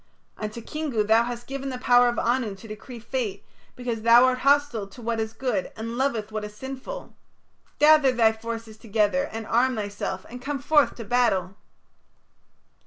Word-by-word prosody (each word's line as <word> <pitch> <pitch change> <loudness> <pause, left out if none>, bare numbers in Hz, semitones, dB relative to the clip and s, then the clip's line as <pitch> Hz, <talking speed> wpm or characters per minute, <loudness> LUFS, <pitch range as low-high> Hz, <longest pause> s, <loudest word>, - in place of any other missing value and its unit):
Unto 215 +2 -6
Kingu 295 -8 -2
thou 220 +2 +4
hast 240 0 -6
given 275 0 -5
the 255 - -4
power 245 -1 +5
of 240 - -3
Anu 235 -4 0
to 210 +4 -13
decree 220 +4 -9
fate, 230 -3 -4 0.3
because 240 -3 -4
thou 235 +2 +7
art 255 0 +1
hostile 275 -6 +2
to 200 - -15
what 230 -1 -2
is 220 0 -2
good 260 +3 -2
and 230 +1 -5
loveth 235 -5 -1
what 215 0 -3
is 210 0 -8
sinful. 270 - -7 0.6
Gather 300 -2 +6
thy 230 -3 +4
forces 225 0 -7
together, 225 +5 0
and 225 0 -5
arm 250 +4 +2
thyself 200 -3 -4
and 245 +1 -9
come 280 +2 -3
forth 295 +2 +3
to 230 - -8
battle." 200 -5 +1
235 Hz, 175 wpm, -25 LUFS, 220-260 Hz, 0.6 s, thou